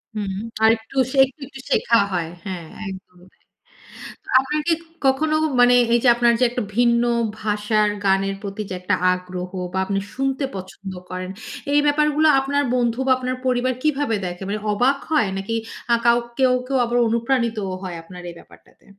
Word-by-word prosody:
হুম। 200 -2 -3 0.3
আর 220 - +7
একটু, 225 +4 -17 0.3
একটু, 270 +3 -4
একটু 270 -1 -12
শেখা 230 - +3
হয়। 170 -3 -2 0.2
হ্যাঁ, 175 -4 -5 0.2
একদম 185 -1 -11
তাই। - - -37 1.0
আপনি 270 +3 -2 0.5
কখনো 305 +4 +2 0.2
মানে 245 0 +6 0.2
এই 240 - +5
যে, - - +3
আপনার 240 0 +4
যে, - - +3
একটা 245 +1 -3 0.2
ভিন্ন 235 -1 +4 0.4
ভাষার 210 0 +1 0.2
গানের 195 0 +2
প্রতি 200 +1 -5
যে, - - -4
একটা 180 - +1 0.2
আগ্রহ 180 0 -4 0.2
বা - - -2
আপনি 195 0 -1
শুনতে 270 +1 -1
পছন্দ 190 +1 -8 0.2
করেন, 185 0 -5 0.4
এই 290 - +5
ব্যাপারগুলো 300 +1 +3
আপনার 285 +1 0
বন্ধু 240 0 0
বা - - +4
আপনার 255 0 -3
পরিবার 255 0 +1
কিভাবে 285 -6 +1
দেখে? 180 +1 -5
মানে 210 +1 -2
অবাক 250 +7 +2
হয়! 300 -10 +3
নাকি 195 +4 -4 0.4
আ - - +6 0.4
কেউ, 260 -1 +4 0.2
কেউ 270 -1 0
আবার 240 +1 -1
অনুপ্রাণিত 235 0 0 0.3
হয় 180 -2 -5
আপনার 180 +1 -11
এই 170 - -10
ব্যাপারটাতে? - - -20
235 Hz, 165 wpm, -22 LUFS, 195-265 Hz, 1.0 s, আর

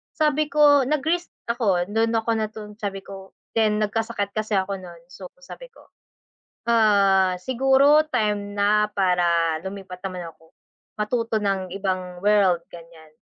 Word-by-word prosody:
sabi 305 -1 +1
ko 290 -2 +5
nag-risk 320 +4 -1 0.2
ako. 205 -7 +1
Do'n 225 +2 +1
ako 225 +1 0
natun 215 -1 -5
sabi 195 -2 -4
ko 195 -1 -11 0.3
then 215 -1 +2
nagkasakit 215 -1 -2
kasi 215 -1 -1
ako 195 +1 -3
no'n, 170 -2 -12
so 185 0 -10 0.2
sabi - - -11
ko, - - -20 0.8
"Ah, 200 -5 +3
siguro 270 +5 +4
time 210 -4 -1
na 210 +1 +3
para 175 -4 +1
lumipat 190 -2 -8
naman 180 -2 -7
ako, 160 0 -25 0.5
matuto 230 +1 -1
ng 190 -3 -2
ibang 185 -2 -3
world 195 -5 +3
ganiyan." 165 -2 -14
205 Hz, 135 wpm, -23 LUFS, 185-230 Hz, 0.8 s, ko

